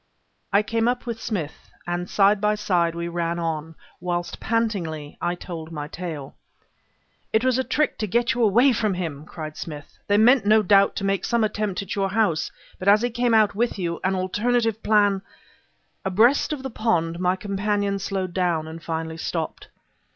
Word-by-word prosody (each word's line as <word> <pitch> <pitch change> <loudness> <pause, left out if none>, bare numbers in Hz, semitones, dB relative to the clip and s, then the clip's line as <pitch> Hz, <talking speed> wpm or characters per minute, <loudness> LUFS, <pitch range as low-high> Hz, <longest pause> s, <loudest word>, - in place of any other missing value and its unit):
I 200 +2 +4
came 230 +1 0
up 245 0 0
with 230 -2 -5
Smith, 170 -9 -4 0.2
and 175 +1 -3
side 200 0 +4
by 210 0 +2
side 175 -5 +1
we 170 0 -3
ran 170 0 -2
on, 160 -1 -3 0.2
whilst 175 0 -3
pantingly, 180 -10 -2
I 175 - 0
told 165 -2 -8
my 150 -2 -5
tale. 155 -4 -6 1.0
"It 220 +3 +2
was 255 0 +3
a - - +2
trick 300 +3 0
to 215 - -1
get 235 +4 +1
you 240 - -2
away 235 +5 +5
from 215 -3 0
him!" 155 -5 -4
cried 155 -2 -7
Smith. 145 -3 -8
"They 205 - +3
meant 245 +3 +6
no 215 +1 +5
doubt 200 0 +4
to - - -3
make 195 -1 0
some 235 -2 +1
attempt 210 -3 -1
at 195 - -5
your 195 -1 0
house, 195 -6 +1 0.3
but 185 - -5
as 210 +3 +6
he 245 - 0
came 240 0 +2
out 215 -2 +4
with 230 +3 0
you, 170 -3 -2
an 190 +1 +1
alternative 225 +4 0
plan 205 -2 +3 0.4
" - - -43
Abreast 220 +12 +3
of 290 -3 -4
the 265 - -4
pond, 170 -8 0
my 180 0 +2
companion 200 +1 -1
slowed 190 -2 -3
down, 175 -4 0
and 160 +1 -8
finally 160 0 -4
stopped. 165 0 -4
195 Hz, 190 wpm, -24 LUFS, 170-220 Hz, 1.0 s, meant